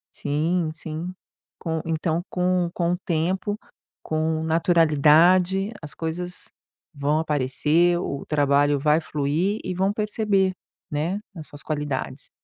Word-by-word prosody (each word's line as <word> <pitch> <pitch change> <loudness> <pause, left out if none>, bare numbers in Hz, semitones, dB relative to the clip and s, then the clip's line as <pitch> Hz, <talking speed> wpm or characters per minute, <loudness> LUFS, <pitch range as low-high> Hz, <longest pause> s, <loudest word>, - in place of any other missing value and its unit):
Sim, 160 +4 0
sim, 160 +3 -5 0.5
com 160 -2 -3
então 165 0 -1
com 180 -1 +1
com 175 -1 0
o 180 - 0
tempo, 185 +4 -1 0.5
com 160 0 -1
naturalidade, 170 +4 +4
as 150 -2 -7
coisas 175 +2 -4 0.4
vão 145 +1 0
aparecer, 155 +3 +2
o 140 -5 -4
trabalho 145 -1 +3
vai 150 +3 +3
fluir 155 +7 -1
e 185 - -3
vão 190 +2 +1
perceber, 205 -2 +1 0.4
né, 160 +7 -1 0.2
as 155 -2 -8
suas 145 - -11
qualidades. 145 -3 -3
160 Hz, 120 wpm, -24 LUFS, 150-180 Hz, 0.5 s, naturalidade